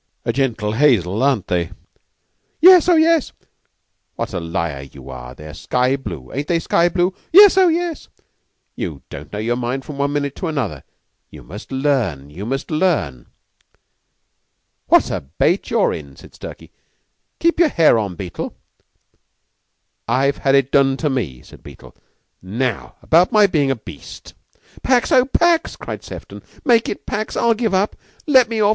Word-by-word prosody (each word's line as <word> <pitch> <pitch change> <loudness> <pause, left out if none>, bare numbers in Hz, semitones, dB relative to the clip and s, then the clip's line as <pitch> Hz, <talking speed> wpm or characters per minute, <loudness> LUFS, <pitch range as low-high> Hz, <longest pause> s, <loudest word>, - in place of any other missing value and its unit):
"A - - 0
gentle 115 -6 -1
hazel, 110 - +2
aren't 130 -8 +1
they?" 85 -3 -1 0.9
"Yes 360 0 +7
oh, 350 - +6
yes!" 325 -2 +3 0.8
"What - - -4
a - - -2
liar 85 -4 -3
you 70 -1 -11
are! 60 -1 -9
They're 75 0 -11
sky 125 - 0
blue. 85 - -8
Ain't 145 +2 -3
they 170 - +1
sky 170 +1 +2
blue?" 180 +1 0 0.2
"Yes 400 +2 +8
oh, 380 -1 +5
yes!" 340 -1 -2 0.7
"You - - -6
don't - - -9
know 105 - -5
your 115 +3 -1
mind 125 +2 -3
from 145 -2 -8
one 140 0 0
minute 140 -1 -2
to 180 - -3
another. 125 - -3 0.5
You - - -13
must 105 - -11
learn 125 - -1
you 95 +8 -7
must 135 +5 -4
learn." 155 - -1 1.6
"What - - +4
a - - -2
bait 70 +4 -1
you're - - +2
in!" 70 -3 -9
said - - -16
Stalky. - - -11 0.7
"Keep 335 0 +1
your 340 -3 +5
hair 160 - +4
on, 100 -4 -4
Beetle." 90 0 -6 1.5
"I've 135 +4 +1
had 135 0 +2
it 135 -1 +2
done 135 -1 +3
to 150 -1 -1
me," 90 - -4
said - - -16
Beetle. - - -14 0.5
"Now 115 +5 -3
about 170 +3 +4
my 215 -2 +5
being 150 -8 +1
a 135 - +1
beast." 115 - -12 0.5
"Pax 255 -2 +1
oh, 255 -1 +5
pax!" 335 +4 +1
cried - - -7
Sefton; - - -10 0.2
"make 235 -4 +3
it - - -6
pax. 215 +1 -4
I'll 235 0 +3
give 220 -3 -1
up! 195 +3 0 0.3
Let 260 -6 +5
me 225 -1 -2
off! 205 -1 +4
135 Hz, 165 wpm, -19 LUFS, -, 1.6 s, Yes